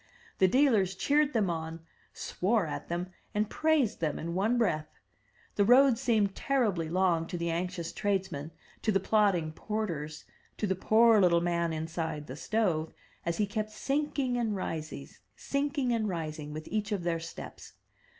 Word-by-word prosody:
The 190 - +6
dealers 215 -6 +3
cheered 290 +8 +2
them 215 -5 +2
on, 160 0 -5 0.3
swore 205 +1 0
at 150 - -5
them 175 +2 -3 0.2
and 210 0 0
praised 310 -7 +2
them 155 -3 -1
in 170 +1 -4
one 210 +7 +1
breath. 155 -9 +1 0.7
The 205 - +5
road 250 +2 +6
seemed 220 -6 +2
terribly 210 -14 0
long 175 -2 +2
to 175 - -4
the 170 0 -1
anxious 170 0 -3
tradesmen, 190 -8 -1 0.3
to 220 - +1
the 195 - +3
plodding 195 -6 +2
porters, 160 -6 -4 0.3
to - - -1
the 190 - +1
poor 220 +3 +5
little 170 -2 +5
man 170 -1 0
inside 160 -1 -3
the 130 - -7
stove, 165 -3 0 0.4
as 170 - 0
he 210 - +2
kept 215 +1 -3
sinking 275 +2 -1
and 225 -3 0
rising, 160 -4 -4 0.3
sinking 280 -2 -1
and 220 -3 0
rising, 155 -4 -4
with 155 +1 -7
each 215 0 -1
of 200 -4 -1
their 170 -1 0
steps. 165 0 -9
190 Hz, 160 wpm, -30 LUFS, 165-225 Hz, 0.7 s, The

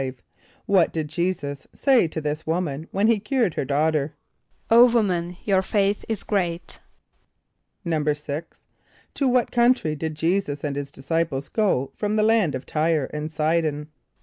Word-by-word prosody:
= - - -33 0.2
What 190 -4 +3
did 155 -2 -3
J[=e]´[s+]us 145 -6 -3
say 260 - +4
to 160 - -5
this 150 +1 -4
woman 160 -2 -2
when 200 +2 0
he 225 -1 +3
cured 220 - 0
her - - -2
daughter? 150 +1 0 0.6
="O 240 +2 +8
woman, 180 -6 0
your 195 -2 +2
faith 200 +1 0
is 220 -3 -2
great."= 175 -4 -2 1.1
=6.= 150 -1 -1 0.7
To 275 - 0
what 250 -1 +2
country 240 -10 +2
did 155 +1 -4
J[=e]´[s+]us 165 -2 -1
and 145 -2 -2
his 140 -1 -4
disciples 140 0 -2
go 190 - 0
from 210 0 -1
the 215 - +3
land 215 -9 +3
of 130 - -6
T[=y]re 155 -2 0
and 150 +1 -3
S[=i]´d[)o]n? 155 -1 0
165 Hz, 150 wpm, -24 LUFS, 150-200 Hz, 1.1 s, ="O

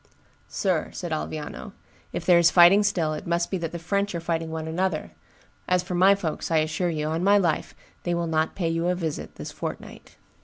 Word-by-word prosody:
"Sir," - - 0
said - - -5
Alviano, 75 0 -5 0.4
"if - - -5
there 175 -2 +6
is 170 0 +6
fighting 175 +4 +7
still, 175 -6 0
it 155 - -6
must 170 0 0
be 190 - -1
that 165 -1 -4
the 170 - -5
French 200 +3 -1
are - - -1
fighting 165 -1 -2
one 160 0 -4
another; 170 0 -2 0.6
as 180 0 +2
for - - -6
my 190 +3 +5
folks, 165 -6 -4
I 165 - +2
assure 155 +3 0
you, 155 -2 -2
on 160 +3 -1
my 200 +1 +5
life, 170 -6 0 0.3
they 175 -1 -1
will 170 0 -1
not 160 -1 0
pay 175 -4 -1
you 165 +1 -1
a 180 - +1
visit 165 -4 -4
this - - -7
fortnight." - - -8
170 Hz, 215 wpm, -25 LUFS, 160-180 Hz, 0.6 s, fighting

